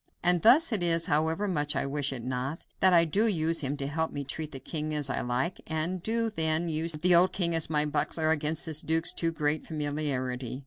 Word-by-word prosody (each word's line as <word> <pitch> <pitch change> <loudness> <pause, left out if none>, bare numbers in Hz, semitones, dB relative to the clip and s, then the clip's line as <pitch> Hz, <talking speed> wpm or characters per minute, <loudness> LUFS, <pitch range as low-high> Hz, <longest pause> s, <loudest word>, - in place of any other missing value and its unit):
And 175 -1 +3
thus 265 +8 +5
it 215 -5 +1
is, 165 -1 +3
however 160 +7 0
much 150 -5 -1
I - - 0
wish 145 0 -1
it 125 -3 -5
not, 130 +5 -4
that 190 - +5
I 170 -1 +5
do 200 +8 +2
use 165 -5 +1
him 140 +1 -3
to 140 - -3
help 160 +3 -2
me 145 - -5
treat 155 +3 -4
the 135 - -7
king 155 +3 -4
as 145 -2 -1
I - - -2
like, 125 +9 -2
and 160 +3 -2
do 230 +3 -1
then 160 -2 +1
use 160 +1 -1
the 155 +4 -1
poor 175 - +7
old 185 +2 +2
king 170 -3 0
as 165 -2 +1
my 150 -1 +1
buckler 155 +1 -1
against 155 0 0
this 160 -2 -1
duke's 160 +1 +1
too 165 -1 0
great 150 -1 -2
familiarity. 135 -5 -3
155 Hz, 230 wpm, -28 LUFS, 145-170 Hz, -, poor